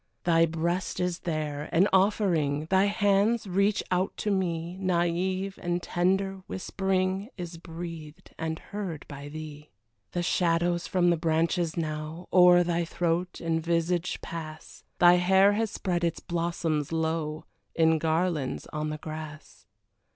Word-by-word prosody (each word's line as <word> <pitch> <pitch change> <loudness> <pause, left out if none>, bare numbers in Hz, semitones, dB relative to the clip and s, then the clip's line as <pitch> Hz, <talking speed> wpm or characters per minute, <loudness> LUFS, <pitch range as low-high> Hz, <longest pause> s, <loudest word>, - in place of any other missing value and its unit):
Thy 165 -1 +4
breast 170 +3 -2
is 180 -1 -1
there, 150 -3 -3
an 185 +4 +4
offering, 175 -7 +2
Thy 190 +1 +5
hands 205 +2 +2
reach 200 +2 +1
out 185 +1 0
to 210 - -1
me, 175 -3 -1
Naive 185 +1 0
and 175 0 -1
tender 190 +2 0
whispering 190 +2 -1
Is 175 -2 -6
breathed 165 0 -9
and 160 0 -2
heard 185 -7 -6
by 145 0 -8
thee. 150 -1 -9 0.4
The 175 - -1
shadows 175 0 +1
from 175 -2 +3
the 170 - +2
branches 165 +1 0
now 155 +1 -4
O'er 180 -1 +7
thy 170 0 0
throat 175 +1 -1
and 165 -1 0
visage 170 +1 0
pass, 160 -2 -8
Thy 175 0 +7
hair 190 +3 +5
has 220 +1 0
spread 175 -3 -2
its 165 -1 0
blossoms 165 -4 -2
low 160 -1 -2 0.3
In 160 -1 +4
garlands, 160 -3 0
on 150 0 -2
the 155 - -4
grass. 155 0 -9
170 Hz, 135 wpm, -28 LUFS, 160-185 Hz, 0.4 s, O'er